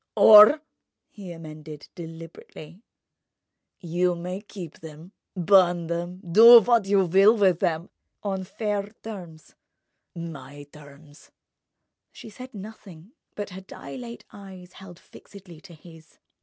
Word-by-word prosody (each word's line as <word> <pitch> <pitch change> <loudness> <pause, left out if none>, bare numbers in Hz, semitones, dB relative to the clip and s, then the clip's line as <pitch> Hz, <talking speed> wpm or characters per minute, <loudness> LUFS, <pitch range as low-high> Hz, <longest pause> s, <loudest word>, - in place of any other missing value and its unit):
"Or," 215 +8 +7 0.5
he 195 -4 -11
amended, 155 -2 -11
deliberately, 165 +1 -12 1.0
"you 175 0 -1
may 180 +3 -7
keep 190 -6 -11
them, 160 +3 -13 0.2
burn 180 -2 +2
them, 175 +2 -6
do 230 +7 +8
what 230 -2 +1
you 195 -1 +2
will 195 +6 +4
with 190 -5 +2
them—on 185 +3 -5
fair 205 0 -4
terms—my 160 -6 -12
terms." 145 0 -17 0.8
She 220 - -13
said 255 +2 -12
nothing, 195 -3 -13 0.2
but 205 -1 -7
her 185 +1 -10
dilate 235 +5 -11
eyes 190 -3 -13
held 185 -2 -14
fixedly 180 -4 -16
to 175 -3 -15
his. 160 -1 -18
180 Hz, 110 wpm, -24 LUFS, 165-205 Hz, 1.0 s, do